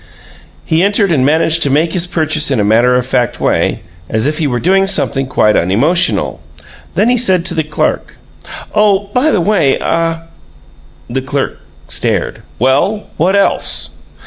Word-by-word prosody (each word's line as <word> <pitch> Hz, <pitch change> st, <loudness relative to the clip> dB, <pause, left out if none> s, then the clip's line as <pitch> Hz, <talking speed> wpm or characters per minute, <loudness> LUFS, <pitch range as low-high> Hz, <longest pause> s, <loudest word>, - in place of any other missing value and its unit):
He 160 Hz, +1 st, +1 dB
entered 200 Hz, 0 st, +1 dB
and 140 Hz, -6 st, +2 dB
managed 160 Hz, +3 st, +1 dB
to 145 Hz, -, +2 dB
make 155 Hz, +4 st, +1 dB
his 180 Hz, -1 st, -2 dB
purchase 155 Hz, -3 st, -1 dB
in 135 Hz, -5 st, 0 dB
a -, -, +2 dB
matter 115 Hz, +4 st, +3 dB
of 125 Hz, -1 st, 0 dB
fact 125 Hz, -2 st, -1 dB
way, -, -, 0 dB, 0.3 s
as 110 Hz, +2 st, +1 dB
if 150 Hz, +2 st, -1 dB
he 155 Hz, -, 0 dB
were 120 Hz, -3 st, -1 dB
doing 195 Hz, +5 st, +2 dB
something 135 Hz, -8 st, 0 dB
quite 105 Hz, -5 st, +2 dB
unemotional; 130 Hz, -, +1 dB, 0.5 s
then 215 Hz, -, +2 dB
he 245 Hz, 0 st, +2 dB
said 185 Hz, -7 st, +2 dB
to 185 Hz, -, 0 dB
the 160 Hz, -, 0 dB
clerk: 150 Hz, 0 st, -2 dB, 0.6 s
"Oh, 205 Hz, -1 st, +1 dB
by 265 Hz, +5 st, +2 dB
the 210 Hz, -, +1 dB
by 185 Hz, -8 st, +2 dB
ah 165 Hz, 0 st, -1 dB, 0.4 s
" -, -, -29 dB
The 130 Hz, +3 st, -3 dB
clerk 140 Hz, +1 st, -3 dB, 0.3 s
stared. -, -, -2 dB, 0.2 s
"Well, 145 Hz, -, 0 dB
what 180 Hz, +5 st, +1 dB
else?" 200 Hz, -, +1 dB
160 Hz, 170 wpm, -13 LUFS, 135-190 Hz, 0.6 s, matter